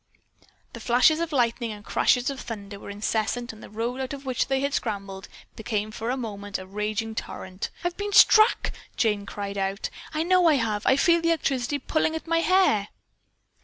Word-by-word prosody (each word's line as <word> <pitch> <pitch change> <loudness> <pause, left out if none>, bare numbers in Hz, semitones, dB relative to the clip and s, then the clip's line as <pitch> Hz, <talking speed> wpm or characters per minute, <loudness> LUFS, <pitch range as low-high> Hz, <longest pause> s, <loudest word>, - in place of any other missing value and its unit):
The - - -8
flashes 255 +6 +4
of 335 -1 -2
lightning 235 -3 0
and 210 -1 -10
crashes 250 +3 +2
of 270 - -7
thunder 200 -4 -7
were - - -10
incessant 220 +4 -2
and 220 - -14
the - - -11
road 235 +4 -3
out 265 +1 -4
of 280 -1 -8
which 255 -2 0
they 270 0 0
had 280 0 -1
scrambled 195 -5 -4 0.3
became 215 -1 -3
for 225 +2 -4
a 255 - 0
moment 205 -4 -5
a 185 - -9
raging 210 +3 -3
torrent. 185 -3 -6
"I've 350 0 -2
been 410 0 -3
struck," 435 +3 +6 0.3
Jane 210 -3 +1
cried 200 -1 -5
out. 195 +1 -2 0.2
"I 315 0 -1
know 365 0 +4
I 310 - +5
have! 220 -5 -1
I - - +6
feel 340 +4 +4
the 335 - +1
electricity 275 -4 0
pulling 315 +3 0
at 320 - -5
my 330 0 +1
hair." 335 - +3
235 Hz, 195 wpm, -25 LUFS, 210-290 Hz, 0.3 s, struck